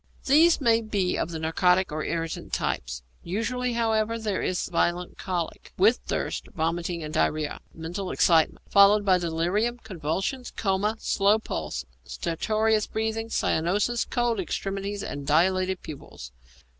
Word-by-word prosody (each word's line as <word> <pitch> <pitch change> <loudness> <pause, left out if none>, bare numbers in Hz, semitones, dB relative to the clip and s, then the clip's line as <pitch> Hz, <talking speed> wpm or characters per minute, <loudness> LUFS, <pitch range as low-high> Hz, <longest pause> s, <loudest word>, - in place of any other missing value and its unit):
_ - - -27
These 320 +5 +5
may 230 -4 +3
be 200 -4 0
of - - -1
the 165 - -4
narcotic 180 +3 +2
or 155 +1 -3
irritant 165 -1 -3
types. 60 0 -2 0.2
Usually, 240 +7 -2
however, 225 -1 +1
there 215 -4 -2
is 180 -1 -1
violent 175 +1 -1
colic, 175 -3 -4
with 215 +6 +5
thirst, - - -2
vomiting, 170 +1 -1
and 155 0 -6
diarrhoea, 155 -1 0
mental 175 +4 -5
excitement, 165 -2 +3
followed 200 +1 +6
by 185 -2 +4
delirium, 175 +8 0
convulsions, 190 - -3
coma, 200 +1 0
slow 205 0 +3
pulse, 75 - -4 0.2
stertorous 215 - 0
breathing, 220 +1 -2
cyanosis, 205 +7 +1
cold 240 -3 0
extremities, 195 +2 -3
and 145 -1 -6
dilated 185 +4 +2
pupils. 65 - -9
190 Hz, 135 wpm, -26 LUFS, 165-220 Hz, 0.2 s, followed